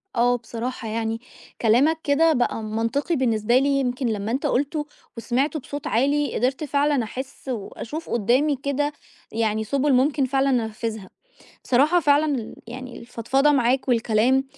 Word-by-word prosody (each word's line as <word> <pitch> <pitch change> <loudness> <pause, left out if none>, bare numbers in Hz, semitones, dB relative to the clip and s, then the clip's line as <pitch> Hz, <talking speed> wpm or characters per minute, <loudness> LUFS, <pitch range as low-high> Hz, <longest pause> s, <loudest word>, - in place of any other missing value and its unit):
آه 245 +1 +3
بصراحة 235 0 -5
يعني، 225 +1 -2 0.4
كلامك 255 +8 +4
كده 315 +3 +3
بقى 245 -4 0
منطقي 230 +9 -1
بالنسبة 235 -3 +2
لي، 275 +2 +2
يمكن 250 -1 -1
لمّا 215 -1 -2
أنت 265 +3 -1
قُلته 290 +3 0 0.3
وسمعته 260 +7 0
بصوت 285 +1 -6
عالي 285 +5 +1
قدرت 260 +5 0
فعلًا 285 -2 +1
أحس 260 +4 -7
وأشوف 250 +7 -5
قدّامي 255 +7 +2
كده 280 +2 -1 0.4
يعني 220 -1 0
سُبُل 280 +5 +1
ممكن 275 +2 +3
فعلًا 270 +1 +1 0.2
أنفذها، 220 -3 -5 0.6
بصراحة 295 +8 +3
فعلًا 295 0 +3
ال 230 -4 -5
يعني 250 +1 -8
الفضفضة 255 +5 +1
معاك 260 0 +1
والكلام 240 +2 +2
255 Hz, 140 wpm, -23 LUFS, 230-285 Hz, 0.6 s, كلامك